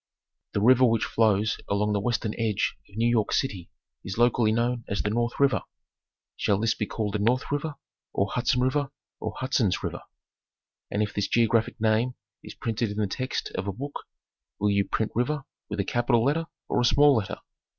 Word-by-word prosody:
The 100 - 0
river 130 +3 +6
which 115 -3 +4
flows 110 -1 +2
along 105 +1 +1
the 100 - +1
western 110 0 -1
edge 110 -3 0
of 100 - -14
New 115 +1 +3
York 115 -3 +2
City 95 -10 -1 0.3
is 95 +2 -5
locally 120 -2 +3
known 120 +1 0
as 100 - -1
the 105 - 0
North 120 +2 -1
River. 140 -2 +3 0.7
Shall 100 -3 +1
this 110 +1 +2
be 105 - -3
called 105 -3 -3
the 105 - 0
North 125 +7 +1
River, 145 +1 -2 0.4
or 100 0 0
Hudson 125 +1 +1
River, 135 +2 +1 0.3
or - - -4
Hudson's 130 - +1
River? - - -4 0.9
And 105 - 0
if 105 - -4
this 100 - 0
geographic 115 +1 +2
name 110 +3 +2 0.3
is - - -10
printed 115 0 -2
in 105 - -6
the 105 - +1
text 130 +7 -3
of 95 - -3
a - - 0
book, 140 +8 -7 0.5
will 105 0 +2
you 100 0 +2
print 110 - -1
river 140 +5 0 0.3
with 105 0 -4
a 100 - +1
capital 120 +1 +2
letter 165 +4 +1 0.2
or - - +1
a - - +1
small 145 +4 +6
letter? 105 -5 -1
115 Hz, 190 wpm, -27 LUFS, 105-125 Hz, 0.9 s, river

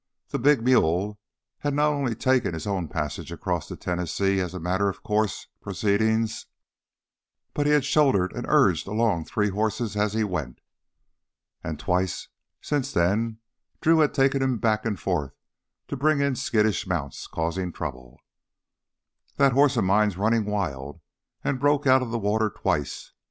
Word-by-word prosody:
The - - -2
big 135 -1 +4
mule 105 -4 +2 0.4
had 145 -1 -1
not 150 +1 +3
only 135 -5 -1
taken 125 -7 +1
his 80 - -6
own 95 -5 -2
passage - - -4
across - - -3
the - - -7
Tennessee 90 +2 -1
as 90 0 -3
a - - -4
matter 95 +4 0
of 95 - -8
course 105 -1 0 0.2
proceeding, 110 +3 +1 1.3
but 145 0 0
had 150 -2 +3
shouldered 135 -12 +3
and - - -5
urged - - +3
along 105 -5 0
three 105 -2 0
horses 110 +2 -1
as 105 0 0
he 110 0 +1
went. 80 -11 -4 1.0
And 80 -2 -5
twice 90 +3 -1 0.3
since 145 -3 -1
then 110 +6 0 0.4
Drew 165 0 +4
had 150 -2 +4
taken 135 0 +3
him 130 -2 +1
back 110 0 0
and 105 -5 -2
forth 70 -2 -2 0.5
to - - -2
bring 145 +2 +2
in 140 -2 +1
skittish 110 -5 +1
mounts 80 -7 -3
causing 85 +2 -2
trouble. 65 -7 -7 1.2
"That 140 -1 +4
horse 140 0 +4
of 115 - +3
mine's 100 0 +2
running 110 +2 +2
wild; 80 -9 -3 0.4
he - - +1
broke 145 +2 +1
out 130 0 +5
of 125 - -3
the 120 - -1
water 110 0 +1
twice." 75 -7 -3
105 Hz, 155 wpm, -25 LUFS, 90-130 Hz, 1.3 s, out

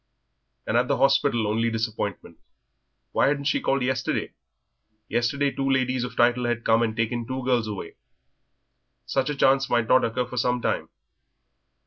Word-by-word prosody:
And 115 - +1
at 125 +1 +2
the - - +1
hospital 135 -4 +2
only 115 +2 0
disappointment. 110 -6 -4 0.7
Why - - +2
hadn't 140 0 0
she 140 - +1
called 135 -1 0
yesterday? 130 0 -2 0.7
Yesterday 140 +4 0
two 135 0 -2
ladies 130 -1 +1
of 125 - -6
title 120 +1 +3
had 120 -1 -2
come 115 0 +4
and 110 -2 0
taken 115 +1 -2
two 130 0 -4
girls 120 -4 +1
away. 105 -3 -7 1.1
Such 135 +1 -1
a 150 - -2
chance 135 0 +3
might 120 -2 +1
not 130 - +4
occur 125 +2 -1
for 125 +1 -9
some 125 +1 +1
time. - - -2
125 Hz, 160 wpm, -25 LUFS, 115-130 Hz, 1.1 s, come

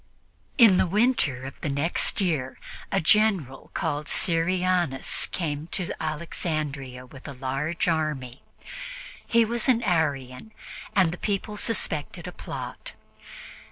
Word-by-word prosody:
In 225 -7 +8
the - - +3
winter 200 - +2
of 135 - -9
the 150 - -2
next 140 +5 +1
year, 155 -9 -1 0.3
a 195 - +3
General 180 - +2
called 150 +1 -1
Syrianus 175 -4 +2
came 155 -3 -3
to 180 -3 0
Alexandria 150 -5 -3
with 135 +3 -12
a 140 - -6
large 135 +7 -2
army. 150 -6 -1 0.9
He 230 -1 +4
was 235 0 -1
an 240 -2 +4
Arian, 160 - -1 0.4
and 185 -5 +4
the 175 - -7
people 210 0 -2
suspected 195 -8 0
a - - -5
plot. - - -7
160 Hz, 120 wpm, -26 LUFS, 140-190 Hz, 0.9 s, In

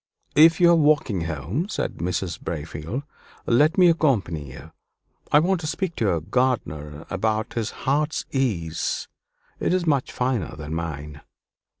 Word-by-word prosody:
"If 160 +2 +7
you 175 -1 +6
are - - +6
walking 145 - +2
home," 85 - -3
said - - -3
Mr. 90 0 -2
Braefield, 80 - -5 0.4
"let 150 +9 +3
me 180 -1 +7
accompany 100 - +1
you. 70 +5 -11 0.6
I - - +7
want 175 +3 +2
to 155 - -4
speak 170 +2 -2
to 115 - 0
your 85 -5 +1
gardener 80 - -1
about 110 +3 -1
his 115 -3 -2 0.2
heart's 145 +3 0
ease 95 - -1 0.5
it 180 - +1
is 180 -2 0
much 140 -5 +1
finer 125 -4 -1
than 75 +1 -6
mine." 75 -3 -5
110 Hz, 145 wpm, -24 LUFS, -, 0.6 s, If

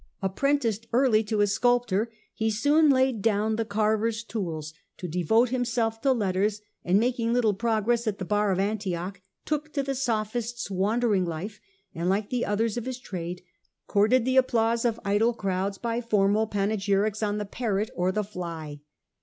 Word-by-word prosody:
Apprenticed 230 +1 0
early 240 -3 +4
to 210 0 0
a - - +5
sculptor, 235 0 +1 0.2
he 220 0 0
soon 290 +8 +3
laid 260 -4 +3
down 215 0 +1
the 225 - 0
carver's 220 +1 0
tools 170 -9 -4 0.2
to 180 - -5
devote 180 +9 +2
himself 235 -3 -1
to 275 - +3
letters, 205 -2 0 0.2
and 180 +2 +3
^ - - +4
making 235 0 0
little 235 -4 +3
progress 230 +2 0
at 205 -2 -1
the 185 - -5
bar 210 +1 +1
of 185 - 0
Antioch, 190 -2 -2 0.2
took 305 0 -2
to 280 - 0
the 275 0 -2
Sophist's 235 -2 -2
wandering 205 +1 +1
life, 175 +6 -5 0.3
and, 170 +2 -2
like 200 +2 0
the 245 -1 0
others 220 +2 0
of 240 - -3
his 260 -1 -4
trade, 180 -8 -6 0.4
courted 220 +4 +3
the 260 0 +1
applause 235 -2 +2
of 230 -1 0
idle 215 +4 +2
crowds 195 -1 -2
by 235 +2 -2
formal 215 -1 +2
panegyrics 205 0 0
on 210 -1 0
the 210 - -3
Parrot 210 -1 -2
or 180 +1 0
the 210 +2 -1
Fly. 170 -7 -6
215 Hz, 170 wpm, -26 LUFS, 195-235 Hz, 0.4 s, a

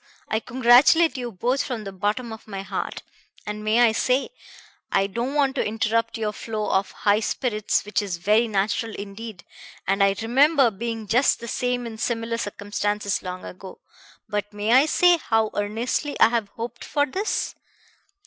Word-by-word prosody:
I 220 - 0
congratulate 260 +8 +5
you 245 -2 -4
both 245 +7 0
from 240 -5 -4
the 195 - -6
bottom 210 +5 -2
of 220 - -12
my 195 -2 -5
heart. - - -4 0.4
And 210 0 -5
may 215 +3 +3
I 235 -2 +6
say 255 +4 +1 0.6
I 195 - +3
don't 235 +8 -3
want 275 -2 +2
to - - +2
interrupt 225 +2 0
your 215 -1 -2
flow 215 -1 -3
of 190 +1 +1
high 205 0 +2
spirits, 215 -3 -1
which 210 - 0
is 195 -4 -4
very 215 +6 +3
natural 215 +2 -1
indeed, 200 -1 -8 0.4
and 195 +1 +2
I 195 0 +3
remember 270 +3 +4
being 225 +2 -4
just 245 +6 +3
the 235 - -8
same 250 0 -1
in 220 -1 -7
similar 230 0 -2
circumstances 205 -1 -2
long 185 0 -6
ago 190 +1 -10 0.5
but 205 -1 -3
may 210 +2 0
I 270 +4 +6
say 355 +2 +5
how 225 -7 0
earnestly 230 +8 -2
I - - +7
have 230 -3 -1
hoped 235 +2 -7
for 285 -1 +1
this? 385 +10 -2
225 Hz, 170 wpm, -24 LUFS, 205-245 Hz, 0.6 s, I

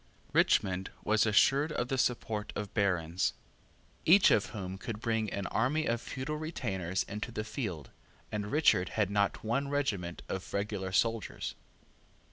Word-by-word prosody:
Richmond 95 0 +3
was 110 +1 +3
assured 135 +8 +4
of 120 -4 -2
the 135 - 0
support 110 -4 -1
of 105 -2 -4
barons, 90 -4 +1 0.7
each 185 +5 +7
of 105 - +3
whom 95 -3 -6
could 110 -3 -5
bring 110 -2 0
an 100 - -3
army 150 +10 +1
of 115 0 0
feudal 140 +4 -4
retainers 95 - -2
into 105 +4 -5
the 105 - -3
field; 105 - -5 0.4
and 105 -1 -3
Richard 110 - +4
had 105 -3 +2
not 100 -1 +1
one 130 +6 0
regiment 105 -12 -2
of 95 +1 -5
regular 100 -2 -2
soldiers. 115 +3 0
105 Hz, 145 wpm, -31 LUFS, 95-125 Hz, 0.7 s, each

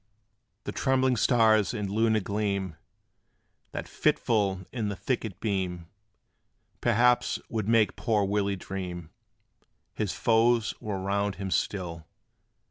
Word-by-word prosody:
The - - -4
trembling 130 -1 +2
stars 110 -3 +3
and 105 -3 -2
lunar 110 +2 +2
gleam, 100 -3 -2 1.0
That - - -5
fitful 100 -5 +1
in 110 -5 -2
the 100 - -3
thicket 110 -4 -3
beam, 90 -6 -2 0.9
Perhaps 120 +1 +3
would 110 -3 -2
make 115 -2 +3
poor 105 -4 +1
Willie 100 0 0
dream 90 -3 -6 0.8
His 105 -4 -2
foes 115 +1 +3
were 105 -3 -4
round 100 +1 -1
him 95 -1 -5
still. 85 -6 -2
105 Hz, 115 wpm, -28 LUFS, 95-115 Hz, 1.0 s, stars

